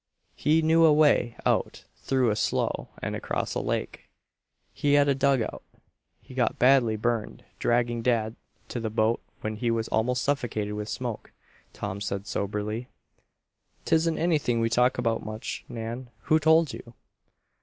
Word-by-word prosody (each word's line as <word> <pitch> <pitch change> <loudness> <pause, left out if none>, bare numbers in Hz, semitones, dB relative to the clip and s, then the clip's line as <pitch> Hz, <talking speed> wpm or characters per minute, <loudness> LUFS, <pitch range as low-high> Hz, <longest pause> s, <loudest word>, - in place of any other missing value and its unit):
He 160 +2 +2
knew 165 +1 +4
a 160 - +7
way 150 -6 +3
out - - 0
through 130 -4 +1
a - - 0
slough - - -1 0.2
and - - -2
across - - -3
a - - -1
lake. - - -3 0.6
He 145 -1 +1
had 145 0 +5
a 140 - +4
dug 135 -2 +2
out. - - -6 0.6
He - - -15
got - - 0
badly 125 -3 +4
burned 115 0 -2
dragging 120 0 +1
dad 115 -2 0 0.3
to 120 - -3
the 115 -1 -2
boat 110 +1 +1 0.2
when 110 0 -3
he 120 +1 -1
was 115 -1 0
almost 125 +3 +1
suffocated 115 -7 -1
with 105 0 -4
smoke," 120 -4 -5 0.4
Tom 100 -1 -5
said 100 -1 -3
soberly. 105 +4 -3 1.0
"'Tisn't 160 0 +2
anything 150 -8 +1
we 115 0 +1
talk 125 +2 +3
about 115 -2 0
much, 110 +1 -6
Nan. 120 +2 -6
Who 155 +2 +3
told 160 -1 +4
you?" 115 -1 -10
120 Hz, 155 wpm, -27 LUFS, 110-140 Hz, 1.0 s, a